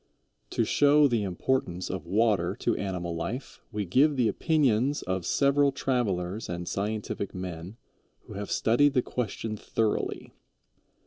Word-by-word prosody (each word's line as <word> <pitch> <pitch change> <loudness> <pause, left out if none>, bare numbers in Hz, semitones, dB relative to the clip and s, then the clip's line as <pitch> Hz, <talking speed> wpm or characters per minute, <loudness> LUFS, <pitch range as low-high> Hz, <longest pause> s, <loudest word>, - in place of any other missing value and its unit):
To - - 0
show 145 0 +5
the 120 -4 +1
importance 95 -1 -1
of 95 -2 -5
water 100 -2 +2
to - - 0
animal 90 -3 -3
life, 120 +11 -5
we 105 -1 -2
give 140 - +3
the 125 -4 +2
opinions 145 -4 +1
of 95 -1 -2
several 140 0 +3
travelers 110 -7 -1
and 85 0 -4
scientific 105 -1 -3
men 90 +2 -6 0.4
who - - -12
have 100 0 -5
studied 140 +5 +3
the 125 - +3
question 110 -2 -3
thoroughly. 110 +1 -2
110 Hz, 135 wpm, -28 LUFS, 95-130 Hz, 0.4 s, show